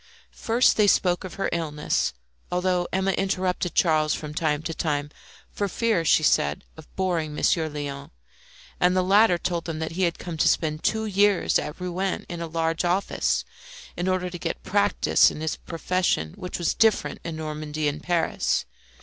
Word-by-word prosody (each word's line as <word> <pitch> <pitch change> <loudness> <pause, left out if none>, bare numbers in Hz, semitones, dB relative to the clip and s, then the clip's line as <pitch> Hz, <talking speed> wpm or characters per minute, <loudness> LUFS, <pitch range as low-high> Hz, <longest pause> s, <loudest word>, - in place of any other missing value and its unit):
First 235 +2 +2
they 210 -1 +4
spoke 180 -2 +2
of 185 - -8
her 195 - -1
illness, 150 -3 -1 0.4
although 180 0 +1
Emma 190 +1 +1
interrupted 185 -2 -1
Charles 155 -3 +3
from 150 -1 -7
time 155 -1 0
to 165 - -3
time, 145 -2 -2 0.4
for 205 - -2
fear, 220 -2 0
she 160 - +4
said, 70 - +2
of 160 -1 -13
boring 170 -5 -1
Monsieur 160 +1 +1
Léon; 140 -1 -6 0.7
and 180 +1 +3
the 185 - +3
latter 195 0 +5
told 170 -1 -2
them 165 -2 -4
that 160 0 -3
he 175 +3 -4
had 170 -2 +1
come 170 -3 -6
to - - +3
spend 155 -1 +1
two 220 0 0
years 205 -1 +3
at 150 +3 -6
Rouen 180 +1 -2
in 175 -1 -6
a 170 - -3
large 165 +1 -1
office, 180 +3 0 0.5
in 175 - -2
order 185 -1 0
to 175 - -7
get - - -4
practice 205 0 +3
in - - -8
his 160 -1 -1
profession, 165 - -1
which 180 - -5
was 175 - 0
different 220 -2 +2
in 165 -2 -5
Normandy 155 -1 -3
and 145 +1 -2
Paris. 170 -1 0
175 Hz, 175 wpm, -25 LUFS, 155-185 Hz, 0.7 s, latter